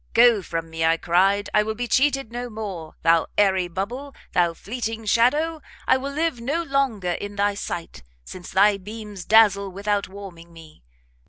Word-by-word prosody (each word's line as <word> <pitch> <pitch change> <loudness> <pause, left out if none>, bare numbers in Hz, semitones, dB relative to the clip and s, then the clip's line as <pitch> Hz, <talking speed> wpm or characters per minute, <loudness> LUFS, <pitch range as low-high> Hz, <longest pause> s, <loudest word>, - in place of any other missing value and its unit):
Go 235 -2 +6
from 165 -2 -5
me, 160 0 -3
I 165 0 +3
cried, 195 +5 +2
I 210 - +5
will 220 +1 -3
be 245 +2 -3
cheated 270 -2 +1
no 245 +1 -5
more! 195 -8 -7
thou 165 0 +4
airy 190 -3 +3
bubble! 240 +11 -5 0.2
thou 175 -2 +2
fleeting 225 +1 -5
shadow! 295 +9 +2 0.2
I - - +4
will 275 +2 -5
live 305 -4 -1
no 290 +8 -1
longer 270 - 0
in 205 +3 -5
thy 205 0 +1
sight, 175 -4 -6 0.2
since 180 -1 -9
thy 200 +1 +4
beams 210 -1 -8
dazzle 205 -3 +5
without 200 +1 -1
warming 185 -4 -11
me! 160 - -15
205 Hz, 170 wpm, -23 LUFS, 180-240 Hz, 0.2 s, Go